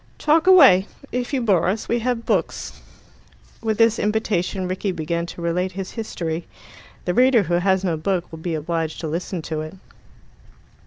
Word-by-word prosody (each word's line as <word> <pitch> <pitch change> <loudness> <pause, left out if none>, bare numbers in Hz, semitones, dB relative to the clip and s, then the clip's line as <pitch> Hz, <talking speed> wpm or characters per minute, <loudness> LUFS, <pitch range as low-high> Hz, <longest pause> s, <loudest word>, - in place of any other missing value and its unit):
"Talk 315 +4 +2
away. 270 - +7 0.2
If 245 0 -3
you 265 -4 0
bore 190 -6 +2
us, 205 +4 -1
we 235 - +1
have 235 0 -2
books." - - -2 0.8
With 220 -2 -1
this 230 0 +3
invitation 205 -3 -1
Rickie 185 +2 -2
began 170 0 -3
to 170 - -8
relate 180 +2 -1
his 190 0 -5
history. 170 -7 -4 0.6
The 180 - 0
reader 250 -1 +4
who 175 0 -3
has 190 +1 +1
no 170 -4 0
book 175 +2 -2
will 160 - -8
be 165 0 -3
obliged 160 0 -3
to 160 - -3
listen 170 +2 -4
to 155 0 -3
it. 155 +4 -8
185 Hz, 170 wpm, -22 LUFS, 170-225 Hz, 0.8 s, away